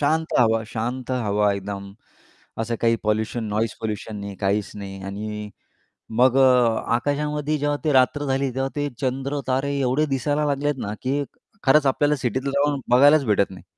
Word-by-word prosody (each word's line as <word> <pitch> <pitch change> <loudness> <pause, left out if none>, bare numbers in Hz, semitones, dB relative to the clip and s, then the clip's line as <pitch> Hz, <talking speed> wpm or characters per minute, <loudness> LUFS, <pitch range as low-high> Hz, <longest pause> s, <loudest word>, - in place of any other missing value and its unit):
शांत 160 +2 0
हवा 115 -2 +3
शांत 120 +3 -4
हवा. 105 -4 +1
एकदम 100 0 -6 0.7
असं 115 +1 -1
काही 115 0 +3
पोल्युशन, 110 +2 -1
नॉईज 110 +1 -1
पोल्युशन 110 0 -4
नाही, 100 -1 -6
काहीच 100 +1 0
नाही. 95 -1 -7
आणि 105 +2 -5 0.7
मग 130 +1 +5
अ, 125 -4 +4
आकाशामध्ये 150 +3 -1
जेव्हा 145 0 0
ती 150 - +2
रात्र 135 +3 +3
झाली 135 0 0
तेव्हा 135 0 -1
ते 145 0 0
चंद्र-तारे 135 +1 -1
एवढे 135 +4 +1
दिसायला 145 +2 0
लागलेत 145 +1 0
ना, 105 - -3
की 140 +2 0 0.4
खरंच 140 +1 +5
आपल्याला 145 +2 +2
सिटीत 130 +1 -2
राहून 140 0 +1
बघायलाच 140 +4 +6
भेटत 100 -2 +2
नाही. 95 -1 -12
130 Hz, 155 wpm, -23 LUFS, 110-145 Hz, 0.7 s, बघायलाच